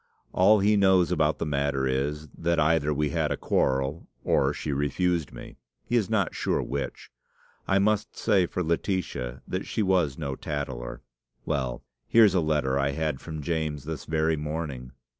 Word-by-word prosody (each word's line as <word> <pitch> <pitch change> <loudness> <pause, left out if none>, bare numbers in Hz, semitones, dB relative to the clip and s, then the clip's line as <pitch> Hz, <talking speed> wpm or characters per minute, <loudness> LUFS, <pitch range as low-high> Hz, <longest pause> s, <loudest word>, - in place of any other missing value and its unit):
"All 100 +3 +5
he 105 +2 +4
knows 95 -3 +4
about 75 -4 +2
the - - -2
matter 70 -2 0
is, 70 +4 -1
that 85 0 0
either 75 -1 +2
we 75 0 0
had - - 0
a - - -1
quarrel, 65 +4 0 0.2
or - - +2
she 75 - -3
refused 80 +3 0
me; - - -11 0.3
he 120 - -1
is 110 -5 +2
not 105 -5 +1
sure - - 0
which. 70 0 -5 0.6
I 95 - +3
must 105 +2 +1
say 100 -5 +3
for 90 - -2
Laetitia, 80 -7 -2
that - - -3
she 110 - -1
was 90 -8 +2
no 70 -4 -3
tattler. 65 -4 -5 0.4
Well, 65 -3 -2 0.2
here's 110 -4 +6
a 90 - +3
letter 75 -4 +1
I 70 0 +1
had 75 -2 -2
from 80 -2 -6
James 80 -3 -2
this 80 +1 -6
very 80 0 +1
morning. 75 -4 -5
80 Hz, 170 wpm, -27 LUFS, 70-90 Hz, 0.6 s, here's